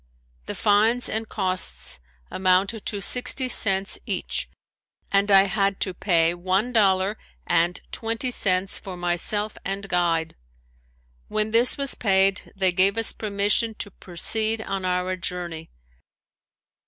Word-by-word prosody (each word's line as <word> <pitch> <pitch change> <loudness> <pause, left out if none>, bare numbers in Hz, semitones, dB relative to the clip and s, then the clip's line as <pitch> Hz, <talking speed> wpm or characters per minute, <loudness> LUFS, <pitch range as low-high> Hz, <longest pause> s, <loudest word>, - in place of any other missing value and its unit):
The - - -4
fines 220 +4 +2
and 220 0 -4
costs 185 - -2 0.3
amounted 190 +3 0
to 205 -2 -3
sixty 255 +1 +2
cents 195 -5 +2
each - - -2 0.6
and 200 +1 +2
I 195 -1 +7
had 195 0 -1
to 190 - 0
pay 170 -3 +1
one 190 +7 -1
dollar 195 -1 +2 0.3
and 175 +1 +1
twenty 230 +3 -2
cents 190 -4 0
for 185 -2 -8
myself 175 +5 +1
and 195 +1 -4
guide. 170 -3 0 0.9
When 215 0 -1
this 235 +2 +3
was 275 -1 +3
paid 195 -2 +1
they 190 -1 +2
gave 190 +3 +2
us 225 - 0
permission 210 +2 0
to 205 - -5
proceed 220 +6 +1
on 195 -3 -4
our 180 0 -1
journey. 175 -3 -6
195 Hz, 130 wpm, -23 LUFS, 185-215 Hz, 0.9 s, I